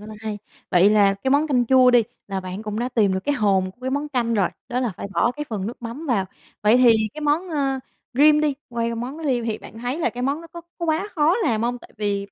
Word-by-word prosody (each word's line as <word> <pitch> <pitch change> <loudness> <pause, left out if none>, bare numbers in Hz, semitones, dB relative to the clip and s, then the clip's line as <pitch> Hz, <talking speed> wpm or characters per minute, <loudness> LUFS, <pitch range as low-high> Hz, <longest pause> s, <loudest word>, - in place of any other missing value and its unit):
Rất 210 - -11
là 215 - -8
hay. 215 -2 -4 0.3
Vậy 185 +2 +5
là 205 -2 +4
cái 230 +7 -3
món 290 +3 +3
canh 250 -5 +1
chua 255 0 +6
đi, 245 -1 +5 0.3
là 195 -1 -2
bạn 185 +3 -6
cũng 210 0 -4
đã 245 - -1
tìm 210 -6 +2
được 190 - -1
cái 290 - +1
hồn 195 -5 +1
của 240 - -25
cái 260 - -3
món 285 +2 -2
canh 240 -5 0
rồi, 195 -4 +2 0.2
đó 250 0 -1
là 240 -6 -1
phải - - -5
bỏ 240 - +3
cái 295 +3 -5
phần 205 -3 -3
nước 240 +1 -7
mắm 240 +8 -6
vào. 215 -8 +1 0.4
Vậy 215 +3 +5
thì 240 -3 +6 0.2
cái 305 - -7
món, 305 +5 +1
ơ, 275 -4 0 0.4
rim 300 +3 +6
đi 300 -2 +1
quay 235 -1 -2
qua - - -3
món 250 +6 -5
rim 245 -4 0
thì 220 -2 -2
bạn 225 - -12
thấy 245 +6 -3
là 295 - +1
cái 245 +2 -6
món 280 +4 0
nó 335 - -11
có 340 +1 -10 0.2
có 340 - -3
quá 320 +6 0
khó 315 +5 +3
làm 230 - 0
hông? 245 +1 -1
Tại - - -16
vì 200 -2 -2
245 Hz, 285 wpm, -23 LUFS, 215-285 Hz, 0.4 s, chua